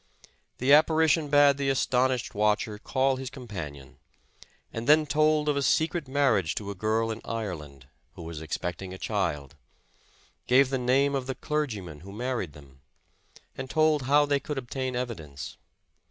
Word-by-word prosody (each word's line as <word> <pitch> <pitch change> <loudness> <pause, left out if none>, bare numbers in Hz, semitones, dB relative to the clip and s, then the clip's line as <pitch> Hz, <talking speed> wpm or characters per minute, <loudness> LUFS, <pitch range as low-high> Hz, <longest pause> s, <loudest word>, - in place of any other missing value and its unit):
The 130 +3 +3
apparition 155 0 +4
bade 145 -1 +5
the 140 -1 0
astonished 130 -2 +1
watcher 105 +1 0
call 130 +3 +1
his 130 -1 -5
companion, 85 - -8 0.7
and 115 +1 -5
then 155 +1 +6
told 155 +1 +2
of 150 - +2
a 140 - 0
secret 160 +2 +1
marriage 130 - +1
to 100 -1 -4
a - - -4
girl 110 +3 0
in 110 - -6
Ireland, 80 - -6 0.3
who 85 - -9
was 80 -1 -7
expecting 90 +4 -5
a - - -9
child; 85 -11 -2 0.9
gave 130 +1 +5
the 135 - 0
name 135 +3 +2
of 135 -2 -2
the 130 - -3
clergyman 110 - -3
who 95 +5 -11
married 115 - -3
them, 70 -2 -16 0.7
and 130 -1 -6
told 155 -1 +3
how 145 +1 +5
they 145 -1 +1
could 150 +1 -5
obtain 130 0 -3
evi 120 -2 -3
dence. 70 -5 -9
125 Hz, 160 wpm, -27 LUFS, 95-140 Hz, 0.9 s, then